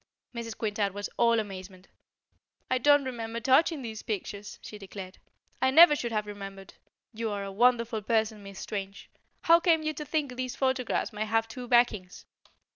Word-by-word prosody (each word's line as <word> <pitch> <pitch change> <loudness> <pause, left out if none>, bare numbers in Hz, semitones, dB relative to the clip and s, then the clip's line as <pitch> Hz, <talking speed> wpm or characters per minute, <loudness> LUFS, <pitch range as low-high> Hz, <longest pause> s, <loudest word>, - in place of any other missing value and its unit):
Mrs. 230 -1 -6
Quintard 205 -2 -1
was 205 0 -5
all 235 -1 +3
amazement. 190 -2 -8 0.8
"I 255 - +2
don't 290 +1 +5
remember 230 -2 -4
touching 270 +4 +3
these 220 -2 -6
pictures," 205 -1 -5
she 210 - -9
declared. 190 -1 -9 0.4
"I 260 - +4
never 310 +3 +8
should 240 -5 -3
have 215 -1 -1
remembered. 195 -1 -9 0.4
You 225 0 -3
are 205 -1 -3
a 195 - -6
wonderful 230 +1 +2
person, 220 0 0
Miss 195 -1 -11
Strange. 195 -1 -6 0.3
How 335 0 +6
came 330 -3 +3
you 310 0 -1
to 300 - -6
think 290 -3 -2
these 255 0 -4
photographs 260 -3 -1
might 215 +1 -2
have 225 +1 +1
two 245 +2 -8
backings? 235 -7 +1
225 Hz, 170 wpm, -28 LUFS, 205-255 Hz, 0.8 s, never